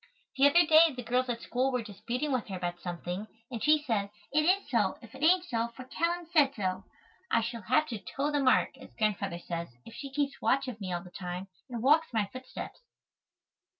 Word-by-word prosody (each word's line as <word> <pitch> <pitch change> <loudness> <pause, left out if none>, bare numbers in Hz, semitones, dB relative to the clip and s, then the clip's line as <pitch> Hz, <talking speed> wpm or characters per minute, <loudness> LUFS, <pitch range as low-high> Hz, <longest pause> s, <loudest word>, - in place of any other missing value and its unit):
The 275 +1 +6
other 345 +4 +6
day 315 -1 +6
the 250 - -5
girls 250 +2 +1
at 235 -1 -3
school 255 +2 0
were 250 -2 -1
disputing 245 +7 -3
with 255 -4 0
her 195 - -5
about 175 -1 -3
something 175 +3 -5 0.2
and 235 -3 -4
she 305 0 +4
said, 210 -7 0 0.2
"It 305 +2 +3
is 380 +4 +3
so, - - +1
if - - -14
it 265 - -11
ain't 355 +3 +5
so, 230 -7 -1
for 255 - -8
Calline 340 +5 -1
said 285 -5 +4
so." 185 -2 -2 0.4
I 230 - +3
shall 230 +1 -4
have 255 +10 +3
to 225 -3 -4
"toe 280 +8 -2
the 290 - +1
mark," 260 -1 +3
as 265 - -14
Grandfather 200 -5 0
says, 170 -1 -4 0.2
if 230 - -11
she 275 +3 -7
keeps 280 0 -2
watch 270 +1 +2
of 230 -4 -6
me 185 -2 -4
all 175 -1 -2
the 180 - -13
time 180 +1 -6 0.2
and 240 -2 -4
walks 310 +4 +5
in 230 - -2
my 205 - +2
footsteps. 255 0 -8
250 Hz, 220 wpm, -30 LUFS, 205-290 Hz, 0.4 s, The